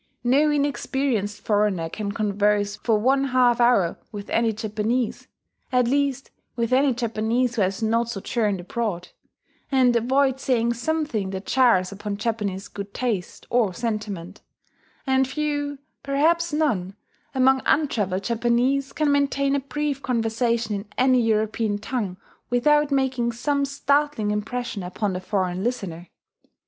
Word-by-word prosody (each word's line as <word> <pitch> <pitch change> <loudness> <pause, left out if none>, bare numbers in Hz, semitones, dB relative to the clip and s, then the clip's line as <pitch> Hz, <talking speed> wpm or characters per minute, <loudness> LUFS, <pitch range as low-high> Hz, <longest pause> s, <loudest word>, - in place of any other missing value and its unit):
No 275 +5 +4
inexperienced 265 -7 -1
foreigner 205 -6 +1
can 200 +4 -4
converse 205 -1 +1
for 225 0 +1
one 270 +5 +2
half 250 -2 +3
hour 220 -8 +3
with 205 -1 -8
any 230 -1 +2
Japanese 220 +3 -2 0.4
at 250 -2 +3
least 275 0 0 0.2
with 235 0 -1
any 270 +1 +4
Japanese 235 +1 0
who 230 - 0
has 195 +3 0
not 230 +1 +1
sojourned 210 -1 -1
abroad 185 -2 -3 0.6
and 255 -3 +4
avoid 265 +3 +2
saying 235 -3 +1
something 240 -5 -2
that 190 0 -5
jars 235 -9 +3
upon 200 0 -5
Japanese 210 -3 -2
good 200 0 -8
taste 220 -8 -3
or 225 -7 +2
sentiment; 210 -5 -4 0.6
and 265 0 +2
few 290 0 -2 0.2
perhaps, 320 +5 +1
none 220 - 0 0.4
among 265 0 +4
untravelled 205 -11 +1
Japanese 240 +4 +1
can 305 -2 +1
maintain 280 -1 +1
a - - +2
brief 280 0 -3
conversation 230 -2 0
in 200 +1 -4
any 255 -1 +4
European 220 -1 0
tongue 205 -4 -3 0.3
without 295 +4 +3
making 260 -4 +1
some 280 +4 0
startling 280 -5 0
impression 220 +1 -3
upon 185 +3 -2
the 180 - -4
foreign 185 -1 -1
listener. 185 -8 -3
235 Hz, 135 wpm, -24 LUFS, 205-265 Hz, 0.6 s, No